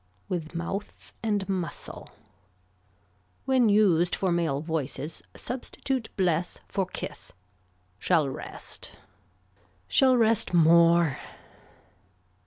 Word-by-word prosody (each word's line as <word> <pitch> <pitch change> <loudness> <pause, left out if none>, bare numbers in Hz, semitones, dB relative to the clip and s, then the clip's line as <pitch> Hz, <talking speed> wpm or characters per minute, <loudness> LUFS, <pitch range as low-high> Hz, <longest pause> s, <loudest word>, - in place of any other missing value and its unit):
With 165 -2 -4
mouth 195 +5 -5
and 205 -4 0
muscle. 185 -3 -4 1.4
When 260 -4 +4
used 180 -5 +4
for 190 -2 0
male 165 -5 +1
voices 155 -1 -3
substitute 260 0 -3
bless 175 -2 0
for 195 -2 -1
kiss. - - -7 0.7
Shall 160 - +2
rest. 135 - -8 0.9
Shall 255 - +4
rest 225 -5 +2
more. 170 -2 +5
175 Hz, 85 wpm, -27 LUFS, 165-210 Hz, 1.4 s, more